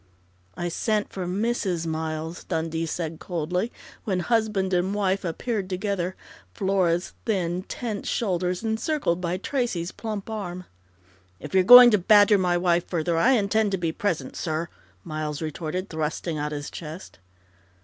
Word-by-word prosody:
"I 175 Hz, -, -2 dB
sent 210 Hz, +4 st, -1 dB
for 185 Hz, -2 st, -4 dB
Mrs. 195 Hz, -3 st, -1 dB
Miles," 160 Hz, +1 st, -4 dB
Dundee 165 Hz, -1 st, -2 dB
said 160 Hz, 0 st, -4 dB
coldly, 180 Hz, +5 st, -2 dB, 0.3 s
when 185 Hz, -4 st, -1 dB
husband 210 Hz, -3 st, +1 dB
and 185 Hz, +3 st, +1 dB
wife 195 Hz, -1 st, 0 dB
appeared 190 Hz, +3 st, -3 dB
together, 185 Hz, -1 st, -2 dB, 0.4 s
Flora's 190 Hz, -4 st, +1 dB
thin, 180 Hz, -4 st, 0 dB
tense 215 Hz, +2 st, -5 dB
shoulders 180 Hz, -3 st, -1 dB
encircled 220 Hz, -, 0 dB
by 175 Hz, 0 st, -1 dB
Tracey's 195 Hz, -6 st, -2 dB
plump 215 Hz, -3 st, -5 dB
arm. 185 Hz, -5 st, -5 dB, 0.7 s
"If -, -, -9 dB
you're 190 Hz, -, +6 dB
going 245 Hz, +4 st, +11 dB
to 210 Hz, -, +4 dB
badger 205 Hz, +1 st, +6 dB
my 180 Hz, -1 st, +2 dB
wife 175 Hz, -1 st, +1 dB
further, 170 Hz, -1 st, -1 dB
I 240 Hz, +11 st, +4 dB
intend 210 Hz, -2 st, +2 dB
to -, -, +2 dB
be 170 Hz, -2 st, -1 dB
present, 175 Hz, -1 st, -2 dB
sir!" 160 Hz, 0 st, -2 dB, 0.3 s
Miles 155 Hz, -2 st, -4 dB
retorted, 160 Hz, +4 st, -4 dB
thrusting 160 Hz, +1 st, -2 dB
out 150 Hz, 0 st, -2 dB
his 145 Hz, -1 st, -5 dB
chest. 160 Hz, -, -9 dB
180 Hz, 145 wpm, -25 LUFS, 165-205 Hz, 0.7 s, going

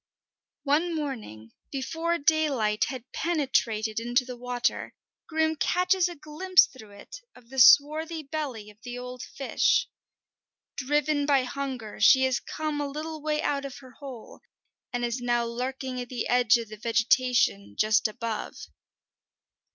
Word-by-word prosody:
One 315 Hz, +4 st, +1 dB
morning, 220 Hz, -, -6 dB, 0.2 s
before 325 Hz, +5 st, -2 dB
daylight 285 Hz, -9 st, +1 dB
had 255 Hz, -1 st, -7 dB
penetrated 230 Hz, -9 st, 0 dB
into 240 Hz, +2 st, +1 dB
the 250 Hz, 0 st, -7 dB
water, 245 Hz, 0 st, -2 dB, 0.3 s
Grim 320 Hz, 0 st, +1 dB
catches 365 Hz, +3 st, +2 dB
a 350 Hz, -, -8 dB
glimpse 315 Hz, +5 st, +3 dB
through 220 Hz, -5 st, -14 dB
it 200 Hz, -, -11 dB, 0.2 s
of 235 Hz, -, -18 dB
the 265 Hz, -, -3 dB
swarthy 310 Hz, +5 st, +5 dB
belly 270 Hz, -8 st, -5 dB
of 210 Hz, +1 st, -25 dB
the 245 Hz, 0 st, -7 dB
old 250 Hz, 0 st, -7 dB
fish. 270 Hz, -, +1 dB, 0.9 s
Driven 290 Hz, +1 st, 0 dB
by 275 Hz, -3 st, +4 dB
hunger, 255 Hz, -4 st, -5 dB
she 260 Hz, +5 st, +6 dB
has 260 Hz, -2 st, +1 dB
come 305 Hz, -1 st, -4 dB
a 290 Hz, -, -2 dB
little 310 Hz, +2 st, -6 dB
way 305 Hz, 0 st, -1 dB
out 280 Hz, -1 st, 0 dB
of 275 Hz, -2 st, -7 dB
her 260 Hz, -2 st, -14 dB
hole, 255 Hz, -2 st, -11 dB, 0.5 s
and 245 Hz, -1 st, -1 dB
is 240 Hz, +1 st, -3 dB
now 240 Hz, -1 st, +1 dB
lurking 255 Hz, +2 st, -4 dB
at 245 Hz, -, -8 dB
the 250 Hz, -, -3 dB
edge 245 Hz, -1 st, +4 dB
of 230 Hz, -2 st, -6 dB
the 215 Hz, -, -9 dB
vegetation 230 Hz, -, +1 dB
just 215 Hz, +1 st, +3 dB
above. 220 Hz, 0 st, -5 dB
260 Hz, 145 wpm, -27 LUFS, 235-300 Hz, 0.9 s, she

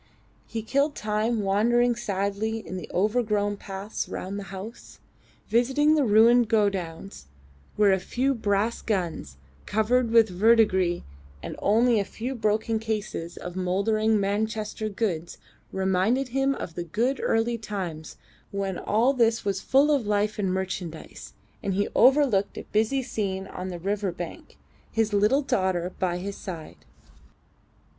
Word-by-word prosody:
He 225 Hz, -1 st, -4 dB
killed 280 Hz, +5 st, +1 dB
time 215 Hz, +2 st, 0 dB
wandering 235 Hz, +5 st, +3 dB
sadly 205 Hz, +1 st, -2 dB
in -, -, -6 dB
the 180 Hz, -5 st, -6 dB
overgrown 210 Hz, 0 st, +1 dB
paths 195 Hz, +2 st, -5 dB
round 195 Hz, +2 st, -5 dB
the 200 Hz, -, -7 dB
house, 200 Hz, +5 st, -9 dB, 0.5 s
visiting 265 Hz, +6 st, +3 dB
the 305 Hz, -2 st, +3 dB
ruined 230 Hz, +1 st, +5 dB
godowns 195 Hz, -, -1 dB, 0.5 s
where 205 Hz, -1 st, +4 dB
a 190 Hz, -, +3 dB
few 255 Hz, +8 st, 0 dB
brass 215 Hz, -1 st, 0 dB
guns 170 Hz, -, -3 dB, 0.3 s
covered 230 Hz, +3 st, +2 dB
with 230 Hz, -1 st, +6 dB
verdigris 190 Hz, -3 st, +3 dB, 0.4 s
and -, -, -5 dB
only 230 Hz, +2 st, +3 dB
a -, -, +1 dB
few 235 Hz, +6 st, -5 dB
broken 220 Hz, -1 st, 0 dB
cases 210 Hz, -6 st, -4 dB
of 180 Hz, 0 st, -7 dB
mouldering 210 Hz, +4 st, +1 dB
Manchester 215 Hz, +2 st, -2 dB
goods 190 Hz, -6 st, -3 dB, 0.3 s
reminded 190 Hz, +8 st, +1 dB
him 270 Hz, +2 st, +1 dB
of 165 Hz, -, -6 dB
the 175 Hz, -, -4 dB
good 235 Hz, -, -1 dB
early 230 Hz, +1 st, +1 dB
times 180 Hz, -8 st, -6 dB, 0.3 s
when 195 Hz, -2 st, -3 dB
all 235 Hz, +6 st, +2 dB
this 230 Hz, -4 st, +2 dB
was 195 Hz, -1 st, -1 dB
full 280 Hz, +3 st, +4 dB
of 270 Hz, -7 st, +1 dB
life 210 Hz, +1 st, 0 dB
and 190 Hz, -3 st, 0 dB
merchandise, 185 Hz, -3 st, -5 dB, 0.3 s
and 195 Hz, -2 st, -2 dB
he 205 Hz, +1 st, +1 dB
overlooked 255 Hz, -6 st, +4 dB
a -, -, -5 dB
busy 225 Hz, +5 st, +1 dB
scene 195 Hz, -6 st, -3 dB
on 185 Hz, -1 st, -6 dB
the 180 Hz, -2 st, -5 dB
river 200 Hz, +2 st, -1 dB
bank, 175 Hz, -, -8 dB, 0.3 s
his 220 Hz, -2 st, 0 dB
little 210 Hz, +8 st, +3 dB
daughter 185 Hz, -8 st, 0 dB
by 180 Hz, -2 st, 0 dB
his 195 Hz, +2 st, -5 dB
side. 165 Hz, -5 st, -8 dB
210 Hz, 140 wpm, -26 LUFS, 190-230 Hz, 0.5 s, with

